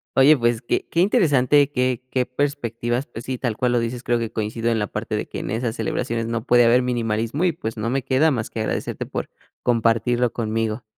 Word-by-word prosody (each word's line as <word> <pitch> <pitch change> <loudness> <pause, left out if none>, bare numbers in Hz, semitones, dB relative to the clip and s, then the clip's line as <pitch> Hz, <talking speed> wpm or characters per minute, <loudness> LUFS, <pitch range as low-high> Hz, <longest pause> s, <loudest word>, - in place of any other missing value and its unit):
Oye, 140 +3 +6
pues, 120 -1 +1
qué 120 - -1
qué 170 - +1
interesante 145 - +4
qué 125 -3 0
qué 130 -1 0
perspectivas, 125 -2 -2
pues 120 0 -9
sí, 130 -1 -3
tal 120 -4 -2
cual 125 -1 +1
lo 120 - +3
dices, 115 +1 -3
creo 120 -1 +1
que 115 -1 -3
coincido 115 +1 -2
en 115 - +1
la 105 - -1
parte - - -3
de - - -4
que - - -6
en - - -5
esas 115 +1 -2
celebraciones 115 -2 -2
no 115 0 -3
puede 120 -2 +5
haber 120 +2 +5
minimalismo 115 +3 -1
y, 180 - +3
pues, 115 -8 -5
no 110 +1 -2
me 135 +1 -1
queda 140 +4 +3
más 115 -5 -2
que 110 - -4
agradecerte 110 - -3
por - - -5 0.3
compartirlo 120 0 +2
conmigo. 110 0 -2
120 Hz, 220 wpm, -22 LUFS, 115-130 Hz, 0.3 s, Oye